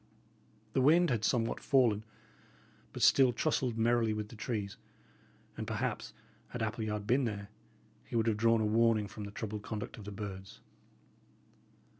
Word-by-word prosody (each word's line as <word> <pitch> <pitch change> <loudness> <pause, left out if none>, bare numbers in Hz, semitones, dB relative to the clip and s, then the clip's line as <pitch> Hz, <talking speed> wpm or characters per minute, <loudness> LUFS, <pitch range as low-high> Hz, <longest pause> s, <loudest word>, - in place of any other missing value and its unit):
The 130 - +2
wind 165 +4 +5
had 115 -3 0
somewhat 115 -1 +1
fallen, 120 -7 +3 0.9
but - - -3
still 130 -2 +6
tussled 125 -2 0
merrily 115 -1 +2
with 105 -1 -4
the 115 - -11
trees, 105 -3 -3 0.8
and, - - -5
perhaps, - - -2 0.4
had 120 -2 -4
Appleyard 110 -1 -2
been 125 +5 +2
there, 100 -3 -4 0.5
he - - -8
would 115 -1 +2
have 110 -2 +1
drawn 115 0 +3
a - - +1
warning 110 -1 +3
from 105 +1 -7
the 100 - -7
troubled 105 0 -5
conduct 105 0 -6
of 105 - -10
the 105 - -6
birds. 95 -2 -7
110 Hz, 155 wpm, -32 LUFS, 105-120 Hz, 0.9 s, still